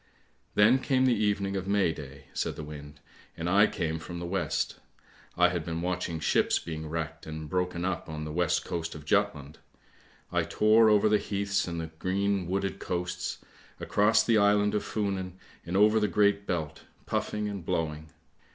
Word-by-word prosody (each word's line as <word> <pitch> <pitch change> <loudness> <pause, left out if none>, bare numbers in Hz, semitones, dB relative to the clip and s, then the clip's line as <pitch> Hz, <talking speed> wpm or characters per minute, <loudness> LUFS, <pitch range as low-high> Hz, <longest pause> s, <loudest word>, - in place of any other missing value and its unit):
"Then 110 +6 +6
came 130 0 +2
the 130 - +4
evening 100 -2 0
of 95 -1 -3
May 100 -5 +2
day!" 70 -2 -10
said - - -2
the - - -6
wind. 75 0 -10 0.3
" - - -33
I 95 +5 +4
came 80 -5 -2
from 85 +2 -7
the 85 - -5
west; 85 -3 -1 0.6
I 90 0 +5
had 90 -3 -2
been 85 +1 -4
watching 90 -2 -2
ships - - +2
being 80 -1 -6
wrecked 80 0 -4
and 80 0 -6
broken 90 +1 -1
up 95 -3 -3
on 75 -1 -5
the 75 - -5
west 85 0 +1
coast 85 -1 -4
of 75 -1 -10
Jutland. 80 -6 0 0.7
I - - +2
tore 110 +1 +4
over 105 0 +5
the 105 0 +3
heaths 100 -1 -1
and 85 -1 -3
the 80 -1 -5
green 100 0 0
wooded 95 +1 -2
coasts, 90 0 -4 0.3
across 110 +2 +3
the 115 -2 +3
island 105 0 +3
of 105 - 0
Funen 95 -4 -2 0.3
and 90 +2 0
over 105 +2 +5
the 105 - +2
Great 100 +1 +2
Belt 80 -3 -3 0.2
puffing 105 0 -2
and 100 -3 -5
blowing. 80 -1 -2
90 Hz, 180 wpm, -28 LUFS, 80-105 Hz, 0.7 s, Then